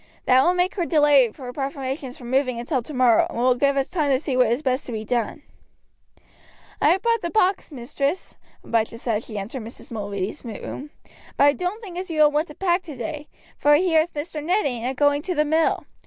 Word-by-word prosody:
That 255 +1 +5
will 355 +4 +3
make 360 +1 +1
her 355 -4 -1
delay 290 -6 +4
her 250 0 -9
preparations 270 -1 -4
for - - -13
moving 255 -1 0
until 250 +2 -1
tomorrow, 250 -3 +3
and - - -7
will 250 +2 +4
give 280 +2 +1
us 270 - +1
time 310 -5 -1
to 265 - +4
see 275 -3 -3
what 250 -2 +4
is 240 +6 0
best 260 -1 0
to - - -5
be 220 -1 -4
done." 245 +5 -2 1.4
"I - - +5
have 380 +2 +2
brought 465 -1 +2
the 340 - -2
box, 380 -3 +1
mistress," 280 +5 -3 0.3
Abijah 230 0 -1
said 230 -2 -1
as 220 - -7
she 215 - -6
entered 220 +6 -5
Mrs. 225 +2 -9
Mulready's 200 -3 -4
room; 245 +5 -7 0.5
"but - - +4
I 285 0 +6
don't 365 +8 -4
think 360 -4 -6
as 370 - -6
you 310 -2 +3
will 295 - +5
want 300 +3 0
to 300 - -12
pack 360 -1 +1
today, 300 -1 -6 0.3
for 295 - +5
I - - +7
hear 335 -1 +3
as 325 - -3
Mr. 300 0 -5
Ned 370 +7 +1
ain't 245 -3 -2
a 265 - -4
going 285 +1 +2
to 360 +3 -3
the 300 0 +2
mill. 315 +2 +1
280 Hz, 230 wpm, -23 LUFS, 245-320 Hz, 1.4 s, I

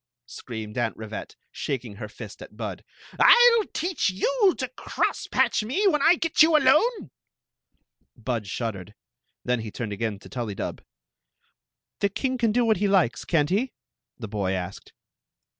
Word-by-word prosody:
screamed 110 -1 -7
Aunt 115 -2 -1
Rivette, 110 -1 -7 0.2
shaking 120 -7 -4
her 110 -1 -6
fist - - -10
at - - -12
Bud - - -5 0.2
" - - -19
I 485 0 +8
'11 425 - -4
teach 350 - 0
you 400 - +2
to 260 - -2
cross 255 - -2
patch - - +2
mc 265 - -1
when 300 -5 +1
I 340 - +6
get 330 -2 +1
you 315 0 +7
alone! 305 - +3 0.5
" - - -48
Bud 115 -5 -1
shuddered 105 -2 -5 0.5
Then 125 -1 +1
he 110 -1 -5
turned 105 0 -5
again 110 0 -3
to - - -14
TuUy 120 -6 -4
dub. - - -5 1.2
"The 200 - +2
king 255 +5 -2
can 230 -2 +2
do 240 +2 +2
what 220 -1 +3
he 205 +3 +1
likes, 185 -11 +2
can't 155 -2 +1
he?" 235 +7 0 0.4
the 115 - -7
boy 100 -2 -2
asked. 95 +1 -6
150 Hz, 170 wpm, -25 LUFS, -, 1.2 s, I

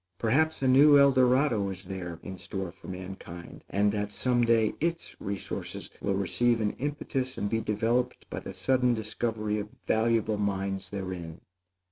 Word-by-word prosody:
Perhaps 140 - +1
a - - +3
new 145 +3 +7
El 140 0 +7
Dorado 125 -5 +3
is 95 -1 -7
there 90 -3 -6
in 95 -2 -7
store 95 +1 -4
for 95 - -15
mankind, 90 -2 -8
and 100 +1 +2
that 105 0 -2
some 120 +3 +1
day 115 -2 +3
its 165 +1 -2
resources 100 -1 -5
will 100 - 0
receive 115 +5 +1
an 105 -2 +1
impetus 135 -2 -2
and 100 - -1
be 115 0 +1
developed 115 +4 0
by - - -5
the 95 - -8
sudden 125 +5 +2
discovery 110 -1 -2
of 105 +1 -7
valuable 110 -1 +2
mines 95 -1 -2
therein. 90 -4 -6
105 Hz, 160 wpm, -29 LUFS, 95-125 Hz, -, new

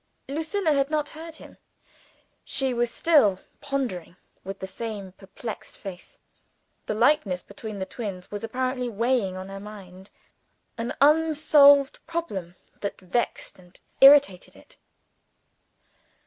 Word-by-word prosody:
Lucilla 320 +4 -1
had 275 0 +1
not 300 -1 -1
heard 320 +1 -10
him. - - -14 0.8
She 265 -2 0
was 240 0 0
still 235 - +3 0.2
pondering, 255 - -3 0.3
with 195 +1 -6
the 190 - -6
same 200 -1 -6
perplexed 200 +4 -9
face. 185 -3 -10 0.7
The 215 - -1
likeness 230 -6 +2
between 210 +1 -8
the 190 - -3
twins 195 -5 -7
was 205 +1 -5
apparently 250 +2 -2
weighing 230 -4 0
on 185 0 -7
her 195 0 -7
mind 195 -2 -11 0.7
an 230 +1 -4
unsolved 295 -2 +5
problem 200 - -4 0.2
that 200 - -4
vexed 190 +2 -3
and 180 0 -18 0.2
irritated 275 -9 +6
it. - - -18
230 Hz, 120 wpm, -25 LUFS, 195-285 Hz, 0.8 s, irritated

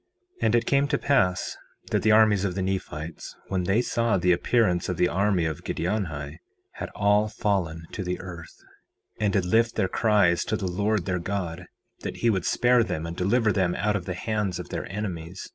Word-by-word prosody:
4:8 - - +1
And 110 +1 +3
it 115 -1 +2
came 140 +2 +2
to - - +1
pass 95 -10 +1 0.4
that - - +2
the 110 - +2
armies 105 -3 +5
of 95 -3 -1
the 95 - -1
Nephites, 85 -4 -4
when 95 -2 -1
they 105 +7 +2
saw 115 -5 +1
the 90 0 +2
appearance 90 0 +2
of 90 - -2
the 90 - +3
army 95 -2 +1
of 80 -2 -3
Giddianhi, 80 -8 -3 0.3
had - - -6
all 105 +1 +3
fallen 90 -7 -1
to 100 - -4
the 90 0 -3
earth, 85 -4 -9 0.6
and 105 -2 +1
did 95 -3 +1
lift 115 +5 +2
their 100 -4 +1
cries 100 -4 +3
to 110 - -1
the 100 - -4
Lord 100 +1 0
their 90 -1 -1
God, 90 -2 -4 0.3
that - - -6
he 115 - +2
would 95 -4 -1
spare 120 0 +4
them 80 -7 -3
and 85 0 -5
deliver 105 +5 +2
them 95 -3 +1
out 105 0 0
of 90 -3 -3
the 90 - -3
hands 105 -2 -2
of 90 - -7
their - - -5
enemies. 90 -4 -5
95 Hz, 205 wpm, -26 LUFS, 90-110 Hz, 0.6 s, armies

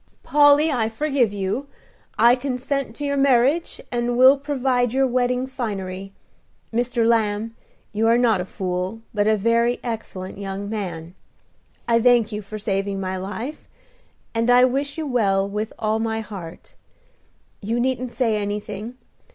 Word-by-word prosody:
"Polly, 295 +1 +5
I 225 -5 0
forgive 265 -1 +1
you; 205 +7 -3 0.5
I 235 +3 +6
consent 260 -1 -3
to 290 - -4
your 280 0 0
marriage, 275 +4 +2
and 240 0 -1
will 260 +2 +8
provide 260 -4 0
your 270 0 +3
wedding 250 0 0
finery. 195 -7 -5 0.6
Mr. 235 0 +1
Lamb, 225 -1 +1 0.4
you 220 +2 +1
are 230 +1 +5
not 230 -6 +3
a - - -4
fool, 185 +3 -4
but 205 -1 +1
a 215 0 +3
very 230 +3 +2
excellent 200 -5 -6
young 195 0 -5
man. 180 -6 -5 0.7
I 230 -1 +3
thank 240 -2 +4
you 210 0 -4
for 215 +2 -8
saving 195 -1 -2
my 190 -1 -3
life, 220 +10 -6 0.7
and 230 +1 0
I 250 +1 +7
wish 275 +4 -2
you 320 - -3
well 200 -7 +1
with 210 +2 -3
all 220 0 0
my 225 0 -1
heart. 190 -6 -9 0.9
You 225 +4 -1
needn't 255 0 -1
say 230 -5 0
anything. 210 +3 -5
230 Hz, 150 wpm, -22 LUFS, 205-255 Hz, 0.9 s, will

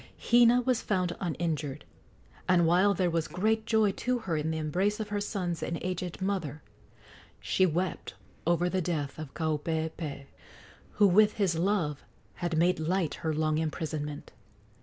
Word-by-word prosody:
Hina 240 +1 +5
was 250 -1 +1
found 185 -4 -1
uninjured, 155 -5 -3 0.6
and, 175 -2 +5
while 185 +5 +4
there 180 -2 +1
was 165 -1 0
great 220 +6 0
joy 220 -3 +3
to 250 +5 -1
her 190 -8 -3
in 155 +1 -1
the 160 - -1
embrace 185 +7 0
of 215 -1 -4
her 205 0 -1
sons 180 -5 -3
and 170 - -2
aged 180 0 -3
mother, 165 -7 -2 0.8
she 185 - +2
wept 175 +3 -2 0.3
over 175 +1 +2
the 185 +1 0
death 155 -4 -3
of 155 -3 -8
Kaupeepee, 160 -2 -2 0.7
who 210 - +4
with 210 +3 +5
his 190 -5 +1
love 165 -5 0 0.3
had 175 -2 -2
made 175 +2 +3
light 170 0 0
her 160 - 0
long 155 0 +1
imprisonment. 155 -2 -4
175 Hz, 155 wpm, -29 LUFS, 160-195 Hz, 0.8 s, Hina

